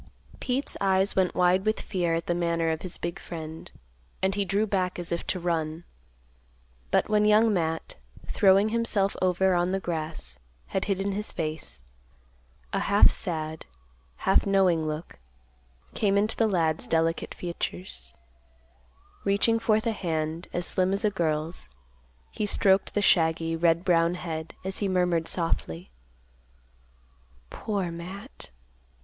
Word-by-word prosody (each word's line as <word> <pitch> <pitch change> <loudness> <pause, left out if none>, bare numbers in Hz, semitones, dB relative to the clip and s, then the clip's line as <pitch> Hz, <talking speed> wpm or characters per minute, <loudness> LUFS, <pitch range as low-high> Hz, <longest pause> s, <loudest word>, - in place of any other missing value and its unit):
Pete's 260 +2 -2
eyes 195 0 +2
went 185 -2 +1
wide 180 +1 +3
with 215 +1 0
fear 175 -4 -1
at 165 - -3
the 175 - 0
manner 170 -1 0
of 160 - -3
his 185 - -3
big 170 0 -4
friend, 160 -1 -8 0.5
and 190 0 +2
he 200 0 0
drew 200 +3 +1
back 185 -3 -1
as 175 -1 -2
if 170 - -3
to 185 - -1
run, 165 -1 -2 1.1
but - - +2
when 210 -1 +3
Young 215 +1 +5
Matt, 165 -3 -2 0.3
throwing 195 +2 +4
himself 220 -4 +1
over 185 +1 +2
on 175 +1 +1
the 195 - +1
grass, 155 - -5 0.3
had 190 - -1
hidden 195 0 -1
his 210 +2 -2
face, 155 - -4 0.9
a - - +1
half 200 +1 +5
sad, 160 -3 -3 0.5
half 190 - +2
knowing 185 -5 +3
look 155 - -6 0.7
came 200 -2 +2
into 215 +2 +1
the 225 - +2
lad's 165 -5 0
delicate 165 0 0
features; 85 - -6 1.1
reaching 205 +3 +2
forth 220 -1 +2
a 230 - +2
hand, 165 -4 -3
as 175 0 -1
slim 185 +1 +2
as 200 +3 0
a 210 - +3
girl's, 160 - -2 0.6
he 210 - -2
stroked 195 -1 +3
the 205 - +2
shaggy, 165 -2 +3
red 165 +1 +2
brown 170 -1 +3
head, 160 -2 -5
as 190 0 -2
he 205 - 0
murmured 180 -3 +1
softly, 90 - -2 1.6
"Poor 195 -5 -2
Matt. 185 +8 -8
180 Hz, 145 wpm, -27 LUFS, 165-195 Hz, 1.6 s, Young